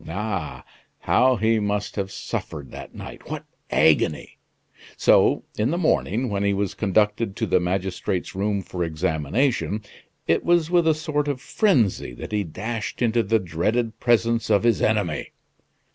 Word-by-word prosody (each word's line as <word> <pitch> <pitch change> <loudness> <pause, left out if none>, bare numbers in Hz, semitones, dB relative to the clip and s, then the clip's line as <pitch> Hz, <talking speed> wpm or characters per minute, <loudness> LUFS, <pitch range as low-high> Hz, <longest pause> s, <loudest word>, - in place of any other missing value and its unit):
Ah! 95 -4 -4 0.4
how 130 +1 +4
he 110 +1 +2
must 105 0 -2
have 95 -2 -3
suffered 70 -6 -5
that - - -10
night! - - -10
What - - -5 0.2
agony! - - +2 0.6
So, - - +4 0.2
in 110 +4 +2
the 170 - 0
morning, 130 - +1
when 100 -1 -1
he 100 0 +1
was 100 -1 -1
conducted 105 +1 +1
to - - -1
the 90 - +3
magistrate's 90 0 -2
room 100 0 -1
for 90 0 -4
examination, 90 - 0 0.4
it 85 - +2
was 170 -1 +2
with 175 -2 +4
a 160 - +4
sort 150 -2 -2
of 140 -3 -1
frenzy 125 - +1
that - - -8
he 105 -1 0
dashed 110 +7 -4
into 115 0 +3
the 110 +1 +2
dreaded 105 +6 -1
presence 115 -1 +2
of 105 -1 +3
his 115 -4 +2
enemy. - - 0
105 Hz, 155 wpm, -23 LUFS, 95-120 Hz, 0.6 s, how